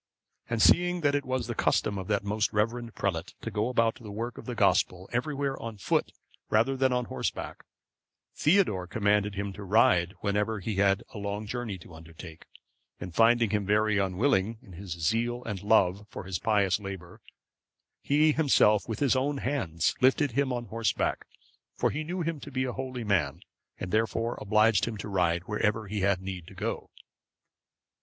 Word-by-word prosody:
And, 115 -2 +1
seeing 180 0 +4
that 145 -2 +2
it 145 -1 0
was 130 -2 -1
the 120 - -3
custom 105 -2 +1
of 95 - -6
that 105 -1 0
most 105 +1 0
reverend 115 +2 -1
prelate 85 -4 -2
to - - -5
go 105 +3 0
about 115 -1 +1
the 110 - -9
work 115 +4 -5
of - - -11
the 125 - -4
Gospel 90 -4 +2
everywhere 135 +2 -2
on 115 -2 -6
foot 100 - 0 0.4
rather 115 +5 +2
than 130 0 +2
on 125 -1 0
horseback, - - -4 0.7
Theodore 150 - +2
commanded 105 0 +1
him 100 0 -3
to 100 - -9
ride 95 -2 +3
whenever 105 +1 0
he 100 +1 -4
had 100 0 +3
a 105 - -6
long 100 +1 -4
journey 115 -3 -4
to 85 -1 -14
undertake; 80 +1 -12 0.5
and 90 -1 -7
finding 115 +1 +4
him 105 -1 +1
very 105 +1 +2
unwilling, 100 +3 +1
in 95 - -14
his 90 0 -6
zeal 115 +8 -1
and 100 -5 -5
love 100 -1 +2
for - - -7
his 95 -1 -4
pious 100 -3 +2
labour, 95 -4 -8 0.8
he 150 +2 +3
himself, 125 -9 +3
with 110 - -2
his 135 -2 +3
own 140 +2 0
hands, 95 - -1
lifted 135 +2 +3
him 135 +2 0
on 120 -1 -3
horseback; 115 0 -1 0.5
for - - +1
he 155 - -3
knew 175 +3 -4
him 165 -2 -2
to 145 - -9
be 130 -1 -1
a 125 -1 -3
holy 130 -2 -5
man, 85 -7 0 0.4
and 95 - -5
therefore 115 +1 0
obliged 105 0 +3
him 115 -2 -4
to 100 - -6
ride 90 -3 +1
wherever 105 +2 -1
he 105 +1 -3
had 95 -1 +1
need 95 -3 -6
to - - -13
go. - - -4
105 Hz, 180 wpm, -28 LUFS, 95-125 Hz, 0.8 s, seeing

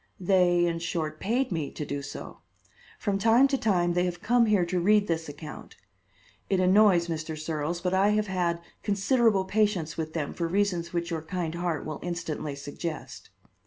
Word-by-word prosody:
They, 180 -2 +3
in 165 -1 -1
short, 160 -2 -3
paid 240 +5 0
me 160 -5 -2
to 150 - -5
do 140 0 -4
so. 140 - -8 0.6
From 200 -3 -1
time 230 +6 +5
to 275 - +1
time 180 -8 +1
they 180 +1 +2
have 175 -1 -3
come 240 0 +3
here 205 -5 +3
to 180 +1 -1
read 205 +3 +4
this 165 -4 -2
account. 150 +1 -9 0.7
It 190 - +2
annoys 185 -2 +5
Mr. 160 -1 -4
Searles, 155 +2 -3
but 180 0 -1
I 195 +2 +4
have 210 0 +2
had 175 -3 -1 0.2
considerable 205 0 +2
patience 200 -6 0
with 160 -1 -4
them 155 -4 -3
for 170 - -2
reasons 175 -2 0
which 170 0 -2
your 165 -1 -2
kind 165 0 -3
heart 170 -2 -2
will 155 -1 -5
instantly 165 -4 -4
suggest." 145 +3 -7
175 Hz, 180 wpm, -27 LUFS, 160-200 Hz, 0.7 s, time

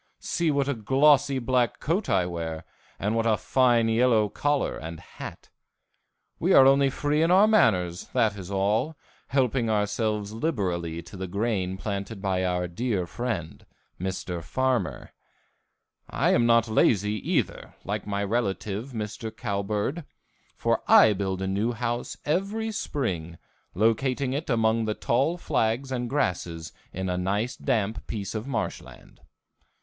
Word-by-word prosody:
See 170 -2 -1
what 140 -2 +1
a 140 - +1
glossy 135 +4 +3
black 125 -1 +1
coat 185 +7 -1
I 95 -2 +3
wear 85 -2 -5 0.3
and 105 +3 -1
what 115 0 +1
a 110 -2 +3
fine 120 -3 +3
yellow 115 -2 +3
collar 145 +5 0
and 80 0 -7
hat. - - -10 0.9
We - - +2
are 135 - +8
only 135 0 +5
free 145 +3 0
in 165 - +3
our 190 +4 +6
manners, 90 - +2
that 115 -4 +1
is 95 -2 -8
all, 105 +10 0 0.3
helping 130 -3 +1
ourselves 105 0 -1
liberally 90 - -2
to 90 - -12
the 95 0 -5
grain 95 -1 -1
planted 100 +1 -4
by 95 -2 0
our 90 -1 0
dear 100 +1 -1
friend, 100 -5 -4 0.4
Mr. 90 -1 -4
Farmer. 125 - -1 1.0
I - - +1
am 120 - +3
not 115 0 +4
lazy, 105 -2 +3 0.2
either, - - -1
like 105 +1 -4
my 100 0 -1
relative, 105 +2 -2
Mr. 110 0 -4
Cowbird, 105 - -2 0.5
for - - 0
I 110 - +7
build 95 -1 -2
a - - -1
new 105 +5 0
house 120 +1 -3
every 200 +8 -1
spring, 90 - -3 0.4
locating 125 +6 +1
it 150 +3 -3
among 115 -1 +2
the 105 -1 -1
tall 135 +9 +1
flags 125 -3 0
and 125 -2 -2
grasses 85 - -2 0.2
in 95 +1 -4
a 90 0 -1
nice 105 +7 -1
damp 110 -5 -1
piece 100 -3 -4
of 110 +3 -4
marshland. 120 -6 -5
110 Hz, 145 wpm, -26 LUFS, 95-130 Hz, 1.0 s, are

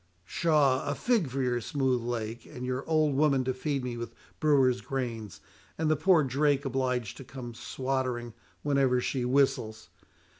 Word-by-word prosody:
"Pshaw! 145 - +2
a 145 - -2
fig 225 - +1
for 135 +1 -2
your 120 -1 0
smooth 130 0 0
lake, 115 -1 -4
and 125 0 -7
your 130 +1 -2
old 155 -2 +3
woman 140 -2 +3
to 130 0 -1
feed 135 +1 -2
me 120 -1 -4
with 115 0 -6 0.2
brewer's 135 -5 +3
grains, 115 -7 -4 0.4
and 155 -1 +1
the - - +4
poor 160 +1 +4
drake 140 +1 +1
obliged 125 -4 -1
to - - -8
come 120 -1 -8
swattering 130 -1 -3 0.3
whenever 135 -3 +2
she 125 +1 -1
whistles! 125 -4 +1
130 Hz, 160 wpm, -29 LUFS, 120-140 Hz, 0.4 s, the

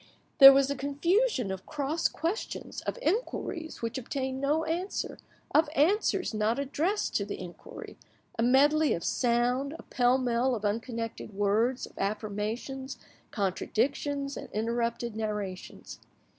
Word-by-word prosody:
There 270 -1 +13
was 275 0 +3
a - - -1
confusion 285 - +1
of 190 -1 -6
cross 300 +2 0
questions, 340 +7 -4
of - - -2
inquiries 340 - -2
which 230 +3 -2
obtained 265 +1 -3
no 300 +3 +1
answer, 345 +5 -3 0.3
of 310 -1 +4
answers 370 - +2
not 215 +2 +1
addressed 310 +9 -1
to - - -1
the - - -6
inquiry, - - -10 0.4
a - - -2
medley 290 +5 +4
of 170 - -6
sound, 250 +4 +1
a - - -12
pell 245 0 +2
mell 250 0 +1
of 215 -2 -5
unconnected 230 0 -3
words, 215 +6 +1
of - - -17
affirmations, 215 +6 -3 0.3
contradictions, 275 +8 -1
and - - -8
interrupted 235 +1 -1
narrations. 210 -4 -5
260 Hz, 130 wpm, -29 LUFS, 225-290 Hz, 0.4 s, There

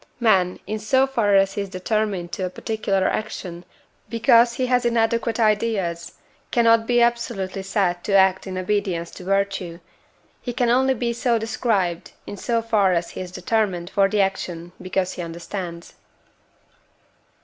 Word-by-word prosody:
Man, 190 -6 +3
in 215 0 -3
so 260 +5 +3
far 230 -7 +1
as 195 0 +3
he 205 - -2
is 200 - -5
determined 190 -1 -2
to 190 - -4
a - - -3
particular 195 -1 -1
action 180 -5 -3 0.4
because 235 +1 +4
he 255 - -1
has 250 0 +2
inadequate 230 0 +1
ideas, 210 -6 0 0.4
cannot 230 -1 +3
be 240 -1 +4
absolutely 225 -5 -1
said 190 -2 -1
to 200 - -1
act 190 0 +4
in 185 -1 -5
obedience 185 -3 -1
to - - -11
virtue; 195 -3 -1 0.6
he 245 - -4
can 245 0 +1
only 265 +2 +3
be 235 0 -1
so 235 0 +1
described, 210 -6 -1
in - - -7
so 230 +2 -1
far 210 -5 +2
as 170 0 -1
he - - -6
is 180 -1 -7
determined 190 -3 -1
for 195 -1 +3
the 210 0 +2
action 175 -3 -3
because 185 0 -1
he - - -6
understands. 170 +1 -7
200 Hz, 160 wpm, -22 LUFS, 185-230 Hz, 0.6 s, because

